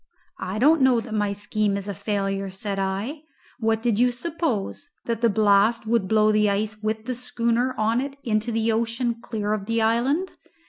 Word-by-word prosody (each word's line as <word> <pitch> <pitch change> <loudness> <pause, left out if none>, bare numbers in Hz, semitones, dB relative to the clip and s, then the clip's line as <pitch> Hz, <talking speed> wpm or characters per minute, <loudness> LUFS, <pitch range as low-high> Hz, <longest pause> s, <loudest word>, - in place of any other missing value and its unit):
"I 190 +3 -4
don't 295 +6 +4
know 260 -2 +5
that 225 -1 -7
my 205 -1 0
scheme 205 0 -1
is 200 0 -6
a 200 - -3
failure," 195 -1 -2
said 195 +1 -4
I. 200 +10 -2 0.4
"What 225 -1 0
did 230 -3 +1
you 250 +1 +5
suppose? 285 - -3 0.2
that 230 -1 -2
the 235 - +4
blast 215 +2 +3
would 220 -3 +1
blow 215 +1 +4
the 210 -1 +3
ice 210 +2 -2
with 215 +1 -2
the 255 - -2
schooner 245 0 -1
on 225 +3 +1
it 275 0 -5
into 220 0 0
the 225 0 +1
ocean 230 +1 -1
clear 210 -3 -2
of 205 -2 -4
the 230 0 +1
island? 250 +11 +1
220 Hz, 190 wpm, -24 LUFS, 205-240 Hz, 0.4 s, know